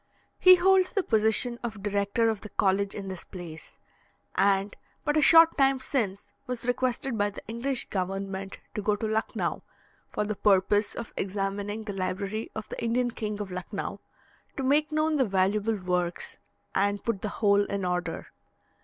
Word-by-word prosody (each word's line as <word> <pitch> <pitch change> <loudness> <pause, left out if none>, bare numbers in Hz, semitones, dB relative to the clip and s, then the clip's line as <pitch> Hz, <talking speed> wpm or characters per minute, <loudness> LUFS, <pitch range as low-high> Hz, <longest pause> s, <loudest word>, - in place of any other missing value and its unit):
He 370 0 +9
holds 375 +1 +4
the 395 - +1
position 220 +1 +2
of 220 -4 -6
Director 205 +2 +1
of 210 -3 -5
the 215 - -8
College 195 0 +1
in 200 -2 -5
this 190 -2 -6
place, 170 -4 -10 0.6
and 200 0 +2 0.3
but 295 - +1
a 305 - +4
short 330 +2 +7
time 270 -1 +4
since 220 -8 -2 0.2
was 250 -2 -3
requested 250 -1 -1
by 205 0 +2
the 205 - -10
English 240 +4 -1
government 195 +1 -3 0.2
to 210 - -3
go 210 +1 +1
to 210 - -4
Lucknau, 220 +1 -1 0.5
for - - -1
the 215 - -1
purpose 205 +1 +2
of 235 - -7
examining 200 +2 -3
the 210 -2 -5
library 195 +3 -3
of 215 -1 -5
the - - -6
Indian 240 +1 +1
King 210 -2 -4
of 200 -2 -5
Lucknau, 180 0 -5 0.6
to 270 - -2
make 295 +4 +2
known 310 0 +1
the 265 - +3
valuable 200 +2 +1
works, 180 -2 -2 0.3
and 200 +1 +1
put 225 -5 -1
the 210 - -2
whole 205 -2 +4
in 200 -2 -3
order. 180 -2 -3
210 Hz, 170 wpm, -28 LUFS, 195-240 Hz, 0.6 s, He